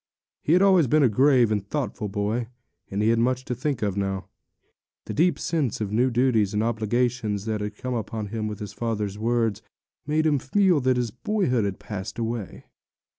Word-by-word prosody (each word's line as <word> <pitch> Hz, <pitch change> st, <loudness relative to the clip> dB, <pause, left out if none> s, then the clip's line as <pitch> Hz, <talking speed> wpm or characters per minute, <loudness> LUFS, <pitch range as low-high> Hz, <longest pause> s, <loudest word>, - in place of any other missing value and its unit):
He 155 Hz, -, +2 dB
had 180 Hz, +2 st, +5 dB
always 185 Hz, -7 st, +5 dB
been 150 Hz, +4 st, +4 dB
a 130 Hz, -, +5 dB
grave 125 Hz, 0 st, +4 dB
and 105 Hz, -2 st, 0 dB
thoughtful 115 Hz, -2 st, -3 dB
boy; 105 Hz, +4 st, -1 dB, 0.4 s
and 100 Hz, +2 st, -1 dB
he 110 Hz, -, +3 dB
had 115 Hz, 0 st, +3 dB
much 130 Hz, +2 st, +1 dB
to 125 Hz, -, -2 dB
think 130 Hz, -1 st, -2 dB
of 100 Hz, -2 st, 0 dB
now. 95 Hz, -1 st, -2 dB, 0.8 s
The -, -, -5 dB
deep 175 Hz, +3 st, +3 dB
sense 150 Hz, -9 st, -1 dB
of 105 Hz, -2 st, -3 dB
new 120 Hz, +4 st, +3 dB
duties 115 Hz, -5 st, +2 dB
and 105 Hz, -, +1 dB
obligations 115 Hz, -2 st, 0 dB
that 110 Hz, -2 st, -2 dB
had 105 Hz, 0 st, -5 dB
come 125 Hz, -1 st, -4 dB
upon 110 Hz, -2 st, -4 dB
him 110 Hz, 0 st, -3 dB
with 105 Hz, -1 st, -5 dB
his 105 Hz, -2 st, -7 dB
father's 105 Hz, -3 st, -3 dB
words, 115 Hz, -2 st, 0 dB, 0.5 s
made 155 Hz, +1 st, +1 dB
him 150 Hz, -3 st, +3 dB
feel 180 Hz, +4 st, +3 dB
that 130 Hz, 0 st, +2 dB
his 120 Hz, -3 st, -1 dB
boyhood 125 Hz, -, 0 dB
had 100 Hz, -2 st, -3 dB
passed 105 Hz, -3 st, -6 dB
away. 115 Hz, -3 st, -4 dB
115 Hz, 195 wpm, -25 LUFS, 105-130 Hz, 0.8 s, had